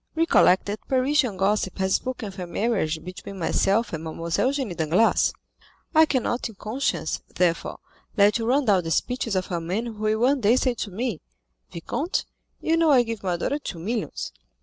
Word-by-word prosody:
Recollect 320 - +4
that 205 +1 -5
Parisian 260 -4 +2
gossip 195 0 0
has 190 0 0
spoken 255 -4 -2
of 195 0 -11
a 180 - -4
marriage 170 -6 -1
between 185 +2 -8
myself 195 +5 +1
and 160 0 -4
Mlle. 160 -1 -6 0.2
Eugénie 260 - 0
Danglars; 170 +8 +3 0.6
I 315 0 +6
cannot 250 -4 -1
in 220 - -13
conscience, 210 - -2
therefore, 170 -2 0 0.4
let 205 +2 +5
you 225 - -2
run 270 +3 +2
down 195 -5 +3
the 165 - -4
speeches 230 - -1
of 185 0 -2
a 170 -1 -1
man 185 +8 -2
who 235 - -5
will 215 0 +1
one 265 +2 +3
day 220 +3 +4
say 255 -1 +2
to 225 -3 -5
me, 215 -1 -3 0.5
'Vicomte, 285 - -2 0.3
you 325 +1 +1
know 330 -1 +3
I 260 -4 +6
give 230 -3 -5
my 180 -3 -1
daughter 285 - -1
two 195 - -6
millions. 215 +7 -3
215 Hz, 185 wpm, -24 LUFS, 185-255 Hz, 0.6 s, I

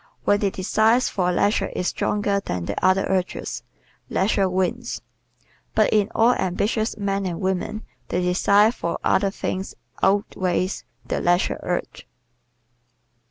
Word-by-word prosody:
When 205 - +3
the 200 - +1
desire 220 +5 +2
for 185 -8 0
leisure 205 +4 +1
is 180 - 0
stronger 205 -1 0
than 90 - -4
the - - -4
other 185 +1 +4
urges, 185 -1 -2 0.5
leisure 195 -1 +1
wins. 190 +7 -2 0.7
But - - +3
in 210 -1 +3
all 235 +2 +5
ambitious 210 +4 -1
men 200 -1 -1
and 170 -2 -4
women 190 +3 -2 0.2
the 180 - -1
desire 200 +4 +4
for 170 -8 -3
other 195 +1 +3
things 190 -1 -4 0.3
outweighs 190 -1 0 0.2
the - - -2
leisure 175 +1 +2
urge. 175 0 -4
195 Hz, 130 wpm, -23 LUFS, 185-210 Hz, 0.7 s, all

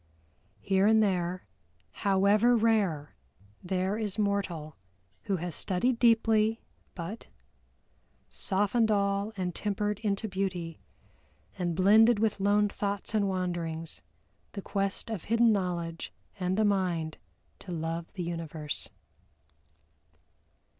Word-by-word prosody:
Here 195 0 +3
and 220 0 +5
there, 180 -2 -1 0.5
however 205 +4 +3
rare, 205 -10 +1 0.5
there 190 +3 -1
is 210 -2 -3
mortal 195 -7 -1 0.5
who 195 - 0
has 175 -1 -4
studied 230 - 0
deeply 225 -1 +3 0.4
but 190 +6 -6 1.0
"Softened 205 +3 0
all 200 0 +1
and 180 -2 -2
tempered 210 +1 -2
into 210 0 -1
beauty; 185 -4 -3 0.8
And 175 -3 -2
blended 215 +5 +6
with 215 -1 0
lone 205 +1 +3
thoughts 200 +1 -3
and 205 -2 +2
wanderings, 170 -3 -3 0.5
The 200 - -6
quest 195 +3 -2
of 205 -7 -4
hidden 230 +1 +4
knowledge, 175 -4 -2 0.3
and 185 +1 0
a 215 - +4
mind 180 -6 0 0.4
To 185 - -9
love 165 0 -3
the 185 -3 -4
universe." 165 -3 -4
195 Hz, 110 wpm, -29 LUFS, 175-210 Hz, 1.0 s, blended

